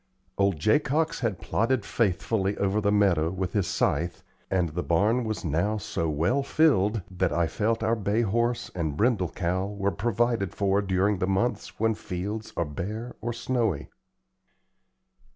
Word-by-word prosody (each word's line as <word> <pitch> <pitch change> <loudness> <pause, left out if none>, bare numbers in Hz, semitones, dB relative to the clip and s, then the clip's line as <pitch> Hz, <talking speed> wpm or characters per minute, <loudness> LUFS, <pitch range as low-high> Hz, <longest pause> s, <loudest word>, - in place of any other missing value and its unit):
Old 100 -3 +2
Jacox 145 - +1
had 110 -8 -1
plodded 115 -1 0
faithfully 100 -1 0
over 100 +2 +1
the 100 0 +2
meadow 95 -6 +3
with 95 0 -3
his 100 -4 +1
scythe, 85 +4 0 0.3
and 90 -3 +1
the 85 +4 -3
barn 105 +9 +2
was 110 -3 -3
now 85 +8 0
so 85 -5 -2
well 85 - +1
filled 115 - +2
that 95 -2 0
I 85 +2 +2
felt 110 +6 -1
our 110 +1 +2
bay 105 +1 0
horse 120 +3 0
and 80 -5 -2
brindle 105 -5 +2
cow 90 +3 -1
were 100 -1 -1
provided 115 -2 0
for 100 0 +2
during 95 +1 +1
the 95 - 0
months 95 +6 -1
when 110 +1 +2
fields 105 +2 -5
are 85 - +1
bare 105 +11 -5
or 120 +2 -2
snowy. 120 - -1
100 Hz, 155 wpm, -27 LUFS, 90-115 Hz, 0.3 s, meadow